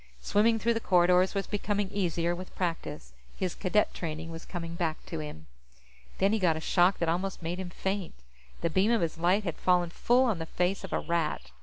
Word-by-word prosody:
Swimming 215 - +3
through 235 +2 +1
the 225 - -1
corridors 180 -1 +4
was 195 - 0
becoming 205 -1 -1
easier 175 -3 0
with 185 +1 -9
practice; 165 - -3 0.2
his 185 -2 -1
Cadet 210 +2 +1
training 160 -1 -5
was 165 0 -8
coming 170 -2 -5
back 165 -2 -2
to 165 - -5
him. 150 - -7 0.7
Then 195 +2 +3
he 220 - +2
got 170 -5 +2
a - - -3
shock 180 +3 +3
that 170 - -1
almost 180 +2 -1
made 175 +3 -3
him 185 -2 -4
faint. 190 +1 -3 0.5
The 170 - 0
beam 190 +6 +3
of 235 -2 +3
his 165 -1 -2
light 185 +5 +3
had 170 -5 -3
fallen 180 -2 +2
full 245 +7 +3
on 225 -9 +1
the 160 - -4
face 180 +4 -1
of - - -7
a - - +1
Rat. 160 - -2
180 Hz, 210 wpm, -29 LUFS, 165-195 Hz, 0.7 s, corridors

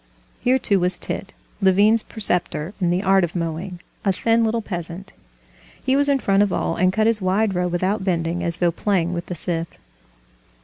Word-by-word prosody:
Here, 255 +2 +2
too, 200 -6 +1
was 180 0 +1
Tit, 195 +2 -5 0.3
Levin's 205 +4 +4
preceptor 180 -6 0
in 175 - +2
the 180 +3 0
art 195 -1 +4
of 170 0 -3
mowing, 170 +2 -4 0.2
a 200 - +2
thin 230 +4 +1
little 225 0 0
peasant. 175 -1 -6 0.7
He 265 0 +2
was 285 +1 +2
in 280 - +3
front 200 -6 +2
of 205 -2 +2
all, 165 - -1
and 185 +1 +2
cut 215 +3 +1
his 225 -2 +4
wide 195 +3 +1
row 180 0 0
without 185 +3 -1
bending, 170 -2 -1
as 170 0 -3
though 175 -1 +2
playing 180 -1 0
with 170 0 -5
the 180 - -5
scythe. 165 0 -3
185 Hz, 190 wpm, -21 LUFS, 175-210 Hz, 0.7 s, Levin's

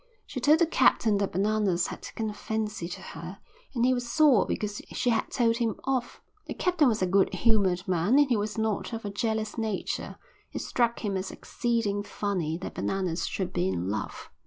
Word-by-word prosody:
She 265 - -5
told 295 +5 +5
the 335 - +4
captain 220 -9 +3
that 200 - 0
Bananas 200 -2 +1
had - - -6
taken 225 - -4
a - - -8
fancy 215 -3 -3
to - - -7
her 170 +4 -8 0.4
and 240 0 +2
he 255 - +4
was 245 -1 -3
sore 295 -8 +5
because 210 -1 -3
she 245 - +1
had 225 - 0
told 230 -2 +2
him 230 -3 0
off. 260 -2 -2 0.2
The - - -5
captain 350 -5 +3
was 220 -5 +1
a - - +4
good 190 +1 +3
humoured 190 -2 +2
man 185 +8 +3
and 290 -1 +6
he 250 - +2
was 210 0 -2
not 220 +1 -1
of 225 -1 -5
a 205 - -3
jealous 220 +1 -2
nature; 220 -3 -3 0.4
it - - -3
struck 235 -2 0
him 200 -2 -1
as 190 - -3
exceeding 230 -4 -1
funny 185 -6 -2
that 185 - -6
Bananas 185 -3 -1
should 190 -2 -3
be 90 - +1
in 90 0 -1
love. 105 0 -4
215 Hz, 205 wpm, -28 LUFS, 190-235 Hz, 0.4 s, and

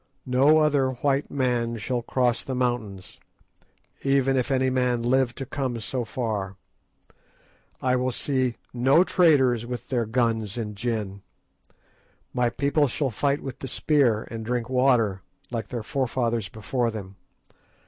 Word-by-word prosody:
No 135 +5 +4
other 145 -4 +3
white 135 +2 0
man 120 -3 0
shall 120 +3 -2
cross 125 0 0
the 130 - -4
mountains, 115 -7 -3 0.8
even 135 -1 +2
if 130 -2 0
any 130 -1 +2
man 125 -2 +1
live 125 0 +2
to 135 - -5
come 130 -2 -3
so 120 +3 -3
far. 105 -5 -3 1.3
I 130 0 +3
will 130 0 0
see 130 -1 0 0.2
no 135 +7 +4
traders 140 - +3
with 125 0 -6
their 120 -4 0
guns 110 -2 0
and 105 -3 -4
gin. 105 -3 -3 1.1
My 125 -1 +2
people 140 +4 +1
shall 135 +1 -1
fight 140 +6 0
with 135 -1 -6
the 135 - -5
spear, 125 -5 +2
and 115 -1 -5
drink 120 +1 -2
water, 125 -7 +2 0.3
like 115 -4 -3
their 120 -1 -5
forefathers 120 -5 -1
before 115 +3 -1
them. 100 -3 -7
125 Hz, 140 wpm, -25 LUFS, 115-135 Hz, 1.3 s, No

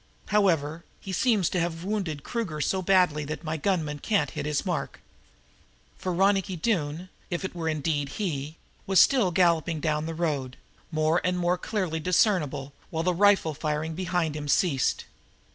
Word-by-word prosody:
However, 170 -6 +2 0.2
he 195 - -7
seems 210 -4 +2
to 180 - -1
have 165 0 -2
wounded 185 -8 -2
Kruger 215 -11 -3
so 185 +6 0
badly 180 -5 +3
that 155 +4 -5
my 160 -1 -2
gunman 155 -3 -1
can't 205 +6 0
hit - - -4
his 150 -1 -1
mark." - - -3 1.0
For 185 - -2
Ronicky 195 +1 +2
Doone, 170 -2 -1 0.2
if 175 +1 -2
it - - -5
were 165 -2 -2
indeed 150 -2 -1
he, 155 -4 -4 0.3
was 190 -1 +4
still 250 -9 +5
galloping 170 -3 +2
down 150 0 -1
the 165 - -4
road, 145 -6 -2 0.3
more 155 +2 +2
and 180 0 0
more 175 0 +2
clearly 180 -6 -2
discernible, 160 -6 +1 0.2
while 160 0 -2
the 180 +1 +2
rifle 195 -3 +4
firing 150 +2 -2
behind 175 -3 -1
him 150 -1 -5
ceased. 140 -2 +1
165 Hz, 160 wpm, -27 LUFS, 150-185 Hz, 1.0 s, still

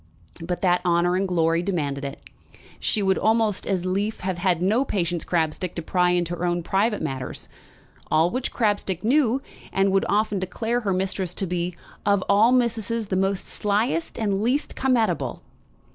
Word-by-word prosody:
But 175 +3 -4
that 180 -1 +3
honour 175 0 +2
and 190 +1 +1
glory 165 -2 +2
demanded 145 -7 -2
it, 140 +1 -5 0.6
she 210 - 0
would 190 -1 +2
almost 220 -2 +1
as 185 -2 0
lief 200 +4 -1
have 185 -1 -2
had 180 -2 +2
no 210 +9 +2
Patience 175 - -1
Crabstick 170 +1 -1
to 170 - -4
pry 180 +1 +2
into 175 -1 0
her 175 - -6
most 175 0 -1
private 210 +3 +1
matters. 130 -1 -5 0.6
All 165 +3 +3
which 255 +1 -2
Crabstick 205 -5 0
knew, 260 +1 +2 0.3
and 195 0 +2
would 195 0 +2
often 210 -1 +1
declare 225 +6 -1
her 210 -5 -1
missus 185 -1 -1
to 195 - -2
be 175 0 -2 0.3
"of 200 -2 +2
all 210 +4 +5
missuses 230 -3 0
the 185 - 0
most 195 0 0
slyest 215 +10 -1
and 205 -3 0
least 255 +6 0
come 260 -1 +2
at 220 -5 +3
able." 170 - -5
190 Hz, 175 wpm, -24 LUFS, 175-215 Hz, 0.6 s, all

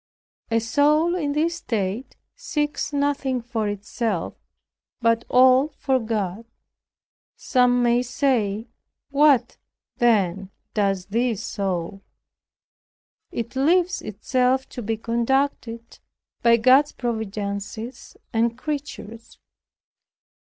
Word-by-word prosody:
A 225 - +2
soul 295 +8 +2
in 295 -5 -1
this 330 +3 0
state 220 - -3 0.2
seeks 295 -13 -2
nothing 280 -2 0
for 230 -3 -3
itself, 205 -1 -3 0.7
but 230 -1 +2
all 255 +2 +6
for 265 -2 +1
God. 215 -2 -3 0.9
Some 250 -2 +2
may 240 0 +3
say, 240 -5 0 0.4
"What, 285 -2 +4 0.4
then, 195 -5 +2 0.2
does 195 -3 0
this 225 0 -1
soul?" 195 -3 -3 1.3
It 235 +2 -5
leaves 350 +7 +2
itself 255 +5 0
to 245 - -7
be 225 0 -2
conducted 235 0 -1 0.4
by 235 0 +5
God's 260 +5 +5
providences 220 0 -5 0.2
and 230 +1 +1
creatures. 275 -6 -6
235 Hz, 95 wpm, -23 LUFS, 220-270 Hz, 1.3 s, all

